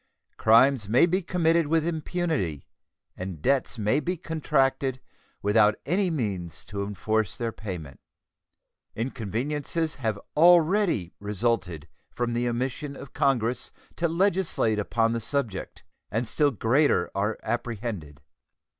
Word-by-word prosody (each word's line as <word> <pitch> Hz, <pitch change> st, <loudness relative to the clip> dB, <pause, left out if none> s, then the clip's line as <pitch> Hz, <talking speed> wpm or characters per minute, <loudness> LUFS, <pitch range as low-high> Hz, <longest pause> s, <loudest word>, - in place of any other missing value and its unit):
Crimes 115 Hz, 0 st, +4 dB
may 125 Hz, +9 st, +6 dB
be 185 Hz, +3 st, 0 dB
committed 165 Hz, -2 st, +2 dB
with 160 Hz, 0 st, +2 dB
impunity 160 Hz, -, -2 dB, 0.5 s
and 90 Hz, -3 st, -6 dB
debts 135 Hz, -, +1 dB
may 110 Hz, +6 st, +2 dB
be 175 Hz, +5 st, -2 dB
contracted 135 Hz, -5 st, 0 dB, 0.4 s
without 105 Hz, +1 st, +4 dB
any 185 Hz, +4 st, +1 dB
means 95 Hz, -, -3 dB
to 100 Hz, 0 st, -5 dB
enforce 105 Hz, 0 st, -1 dB
their 115 Hz, -1 st, -2 dB
payment. 90 Hz, -11 st, -7 dB, 1.0 s
Inconveniences 135 Hz, -, -2 dB
have 110 Hz, -4 st, -1 dB, 0.2 s
already 170 Hz, -, +4 dB
resulted 100 Hz, -6 st, -1 dB, 0.2 s
from 120 Hz, -1 st, -2 dB
the 120 Hz, +1 st, 0 dB
omission 130 Hz, +4 st, -3 dB
of 135 Hz, -, -11 dB
Congress 125 Hz, -5 st, +1 dB, 0.3 s
to 170 Hz, -, +1 dB
legislate 170 Hz, -, +1 dB
upon 115 Hz, +2 st, +1 dB
the 115 Hz, -, -2 dB
subject, 115 Hz, -5 st, -3 dB, 0.3 s
and 115 Hz, +2 st, -1 dB
still 145 Hz, +5 st, +2 dB
greater 115 Hz, -, +2 dB
are 105 Hz, +2 st, -1 dB
apprehended. 110 Hz, -, -4 dB
120 Hz, 120 wpm, -26 LUFS, 105-155 Hz, 1.0 s, may